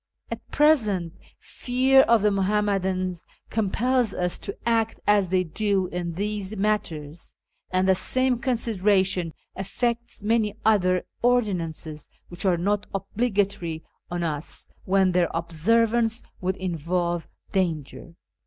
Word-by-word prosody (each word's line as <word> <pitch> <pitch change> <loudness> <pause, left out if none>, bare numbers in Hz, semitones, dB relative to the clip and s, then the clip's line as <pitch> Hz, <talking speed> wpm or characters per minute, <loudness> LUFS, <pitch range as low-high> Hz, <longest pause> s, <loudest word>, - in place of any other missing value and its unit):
At - - -4
present, 215 - +2 0.2
fear 260 +2 +3
of 230 -5 +4
the 210 - +4
Muhammadans 190 -3 0 0.3
compels 235 +3 +1
us 180 -1 -1
to 200 - -6
act 225 -1 +1
as 205 -3 +3
they 185 0 +2
do 195 +3 0
in 175 -1 -3
these 205 +2 -3
matters, 170 -7 -2 0.3
and 185 0 +1
the 190 - +6
same 255 +5 0
consideration 195 -7 +1 0.2
affects 235 +4 -2
many 215 -1 +1
other 185 -4 +3 0.2
ordinances 175 -11 -1 0.2
which 175 +3 -7
are 180 -2 +3
not 200 +4 0
obligatory 195 -5 -1 0.3
on 175 0 -2
us 155 -1 -4 0.2
when 190 -1 +3
their 180 -1 +2
observance 225 +8 +1 0.2
would 185 +1 -1
involve 175 -1 -2 0.2
danger. 170 -2 -2
195 Hz, 115 wpm, -25 LUFS, 175-220 Hz, 0.3 s, the